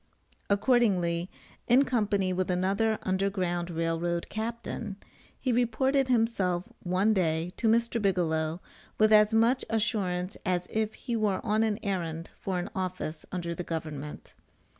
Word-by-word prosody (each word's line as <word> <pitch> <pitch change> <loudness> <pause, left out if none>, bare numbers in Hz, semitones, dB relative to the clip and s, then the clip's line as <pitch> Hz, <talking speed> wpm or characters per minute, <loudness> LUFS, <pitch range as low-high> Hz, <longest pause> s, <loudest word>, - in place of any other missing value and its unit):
Accordingly 200 -6 +2 0.4
in 255 +4 +5
company 205 -7 +1
with 185 0 -1
another 195 +5 +1
Underground 185 -2 -1
Rail 165 -1 -1
Road 170 0 -2
captain, 220 -2 -4 0.4
he 255 - 0
reported 255 +3 +2
himself 220 -7 +1
one 185 +4 +2
day 170 -2 0
to 230 - +1
Mr. 230 +1 +2
Bigelow 165 -4 0 0.4
with 215 0 +5
as 210 0 +6
much 230 +3 +3
assurance 200 -4 -1
as 180 -2 0
if 220 0 -1
he 240 -3 -4
were 210 -4 +1
on 215 0 +2
an 220 -2 +1
errand 170 -5 -3
for 190 -2 -2
an 175 - -4
office 185 -4 -4
under 170 -2 -3
the 180 - -5
government. 155 -3 -6
195 Hz, 140 wpm, -29 LUFS, 175-225 Hz, 0.4 s, as